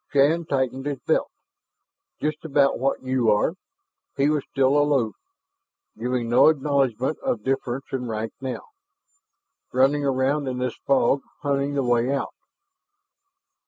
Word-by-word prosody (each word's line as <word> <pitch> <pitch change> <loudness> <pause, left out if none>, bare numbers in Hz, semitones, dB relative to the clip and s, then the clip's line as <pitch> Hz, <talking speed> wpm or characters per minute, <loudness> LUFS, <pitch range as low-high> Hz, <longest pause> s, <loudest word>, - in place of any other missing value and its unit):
Shann 150 +4 +3
tightened 135 -1 -1
his 145 -2 -2
belt. - - +1 0.9
"Just 155 0 -2
about 140 -3 +2
what 135 +1 -1
you 130 -3 +1
are." 105 +9 +2 0.6
He 140 +1 +3
was 150 -2 0
still 135 0 +2
aloof, 145 -6 +2 0.8
giving 125 0 -2
no 120 +5 +5
acknowledgment 140 -3 0
of 110 -3 -2
difference 135 0 -2
in 125 -2 -3
rank 110 0 -4
now. 130 -1 -4 1.1
"Running 135 +3 +3
around 135 +1 +1
in 130 -1 -2
this 125 -2 -2
fog 135 0 +3 0.2
hunting 140 0 0
the 140 - +1
way 120 +1 +2
out." 140 -1 -2
135 Hz, 130 wpm, -24 LUFS, 125-145 Hz, 1.1 s, no